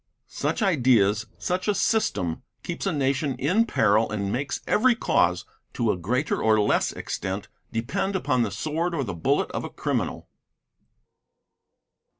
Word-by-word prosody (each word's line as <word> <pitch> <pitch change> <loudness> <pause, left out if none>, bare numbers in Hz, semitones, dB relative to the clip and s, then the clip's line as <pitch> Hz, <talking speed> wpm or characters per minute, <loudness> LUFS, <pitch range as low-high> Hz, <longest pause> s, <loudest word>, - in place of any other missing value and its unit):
Such - - -1
ideas, 120 - +3
such 180 0 -2
a 210 - +2
system, 90 - 0 0.2
keeps 175 +3 -4
a - - +2
nation 140 -1 0
in 180 - +2
peril 110 - +3
and 100 -2 -2
makes 140 +5 -2
every 245 +2 +3
cause, - - +1 0.3
to 115 -3 +1
a - - -1
greater 125 - -1
or 110 -1 +4
less 105 - +2
extent, 95 +1 -4 0.2
depend 190 - -2
upon 130 -9 +1
the 115 - +1
sword 155 - -2
or 140 - 0
the 100 -6 -4
bullet 85 - 0
of - - -3
a - - -5
criminal. - - -2
130 Hz, 150 wpm, -25 LUFS, 105-180 Hz, 0.3 s, or